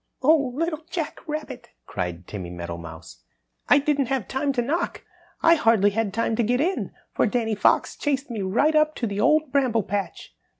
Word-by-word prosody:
"Oh, 285 -2 +4
Little 325 +1 -2
Jack 325 -4 -4
Rabbit," 295 -5 -6 0.2
cried 90 -1 -4
Timmy 95 -3 -7
Meadowmouse, 85 -4 -8 0.5
"I - - +7
didn't 285 -2 +1
have 260 -6 -1
time 275 +2 -1
to 245 - +1
knock. 335 +8 -2 0.4
I 330 - +7
hardly 225 - +4
had 220 -1 -1
time 225 +2 0
to - - +3
get 245 +3 +1
in, 360 +6 -1 0.2
for - - +2
Danny 225 0 0
Fox 210 - +2
chased 280 -2 -2
me 220 -3 -3
right 230 +12 +2
up 310 0 +3
to 240 - -2
the 200 -2 -3
Old 310 +3 +3
Bramble 255 -6 +2
Patch." 200 +1 -4
245 Hz, 180 wpm, -24 LUFS, 200-295 Hz, 0.5 s, I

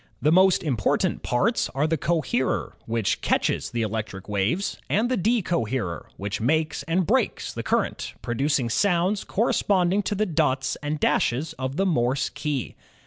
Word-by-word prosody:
The 150 +4 +2
most 185 +1 +5
important 125 - 0
parts 195 - +1
are 140 +2 +2
the 160 +1 +1
coherer, 155 -5 -1
which 115 -2 0
catches - - 0
the 120 -1 -1
electric 110 -3 -4
waves, 105 - -1
and 225 +4 +2
the - - +3
deco 185 - +1
herer, 105 -10 -3
which 100 +2 -4
makes 155 +5 +1
and 175 +2 +1
breaks - - 0
the - - -4
current, - - -1
producing 130 0 0
sounds 190 - +2
corresponding 195 -3 +1
to 205 +1 -2
the 215 +2 +1
dots 150 -7 0
and 150 +1 -3
dashes 140 +4 +1
of 130 +1 -3
the 195 - +1
Morse 130 -6 +1
key. 145 -5 -3
150 Hz, 155 wpm, -25 LUFS, 120-180 Hz, -, most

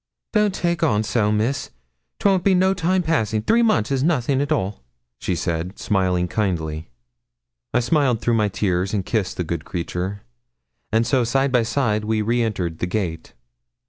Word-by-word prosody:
'Don't 210 -3 +2
take 170 0 -1
on 110 -10 +2
so, 105 -1 +1
Miss; 120 +5 0 0.5
'twon't 195 -3 +2
be 195 0 +4
no 190 +1 +3
time 180 0 +1
passing; 110 -10 +1
three 230 +2 +3
months 140 - +2
is 135 -1 +1
nothing 140 -3 +1
at 145 +2 -2
all,' 100 - -1 0.4
she 90 - -1
said, 85 +3 -3
smiling 90 -3 +1
kindly. 80 -6 -2 0.8
I - - +2
smiled 130 -2 +2
through 120 - 0
my 105 -2 +2
tears 95 0 -1
and 95 -3 -1
kissed 105 -5 -1
the 90 - 0
good 85 -1 -4
creature, 90 +4 -4 0.7
and 115 +1 +2
so 130 0 +2
side 135 +3 +1
by 125 -2 +4
side 110 -3 0
we 110 0 0
re 120 +3 +1
entered 90 -8 -2
the 90 - -1
gate. 90 -4 -3
110 Hz, 175 wpm, -22 LUFS, 95-140 Hz, 0.8 s, be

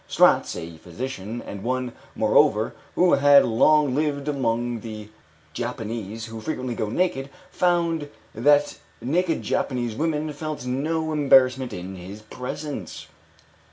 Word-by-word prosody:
Stratz, - - +4
a 85 -1 -7
physician, 110 +5 -6
and 100 - -7
one, 125 +1 -2 0.2
moreover, - - +3 0.2
who 180 0 +4
had 140 0 +6
long 145 +4 +4
lived 145 0 -1
among 120 -4 -1
the 110 -2 -8 0.4
Javanese 110 0 -4
who 115 -1 -8
frequently 130 -2 -3
go 110 -2 -2
naked, 140 - 0 0.2
found 170 -4 +1 0.2
that 145 +5 +3 0.2
naked 165 +5 0
Japanese 120 -4 -1
women 155 +2 -1
felt 150 -2 -5
no 155 +5 -1
embarrassment 130 -4 +4
in 95 0 -7
his 95 +4 -9
presence. 125 - -6
130 Hz, 120 wpm, -24 LUFS, 110-150 Hz, 0.4 s, had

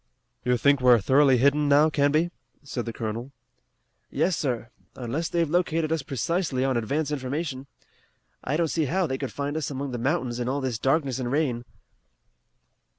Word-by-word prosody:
"You 125 0 +2
think 140 +1 +3
we're 125 -2 +6
thoroughly 135 +5 +4
hidden 140 +3 +3
now, 150 +2 +5
Canby?" 155 +4 +2 0.3
said 130 -4 -4
the 115 - -3
colonel. 115 +4 -5 0.8
"Yes, 180 -1 +1
sir. 120 -7 -2 0.2
Unless 135 +7 -3
they've 170 -1 +1
located 165 -1 0
us 160 -2 +1
precisely 140 - -1
on 135 -1 +1
advance 140 +6 -1
information. 140 0 -3 0.8
I 145 +4 -1
don't 170 -1 +2
see 160 0 0
how 180 +7 +1
they 130 -4 -3
could 135 - -4
find 145 +1 -3
us 155 -3 -2
among 140 -1 -4
the 120 - -4
mountains 130 -2 -1
in 120 0 -1
all 140 +2 -1
this 130 -5 -2
darkness 135 -1 +1
and 125 -1 -2
rain." 130 -5 0
140 Hz, 170 wpm, -26 LUFS, 125-155 Hz, 0.8 s, we're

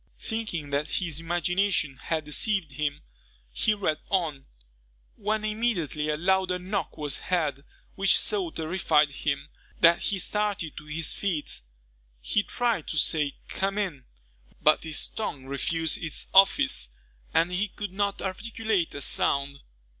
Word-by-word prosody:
Thinking 215 -10 -4
that 145 +2 0
his 165 -5 0
imagination 175 -2 0
had 155 +5 -2
deceived 170 +1 +2
him, 145 +1 -2 0.5
he 215 - +1
read 180 -7 0
on, 160 -8 0 0.7
when 215 +1 -1
immediately 210 - -1
a 150 - 0
louder 185 +1 +2
knock 190 +3 -3
was 145 -3 -1
heard, 155 -6 -1 0.3
which 195 -2 +4
so 200 -5 0
terrified 160 -2 +2
him, 140 - -2 0.3
that 170 +1 +6
he 200 - 0
started 205 -5 -1
to 150 - -9
his 155 +1 0
feet. 170 - -3 0.6
He 205 - +1
tried 230 -5 -1
to 155 - -2
say 150 0 +2
"Come 195 +1 -2
in," 175 -11 -2 0.5
but 155 +2 +4
his 155 -2 -1
tongue 145 -11 -5
refused 160 +4 0
its 165 -4 -1
office, 190 - +5 0.4
and 170 +2 +2
he 190 +4 0
could 205 -1 -6
not 200 0 -1
articulate 210 -2 -1
a 145 - -3
sound. 140 +1 +1
170 Hz, 140 wpm, -27 LUFS, 150-200 Hz, 0.7 s, that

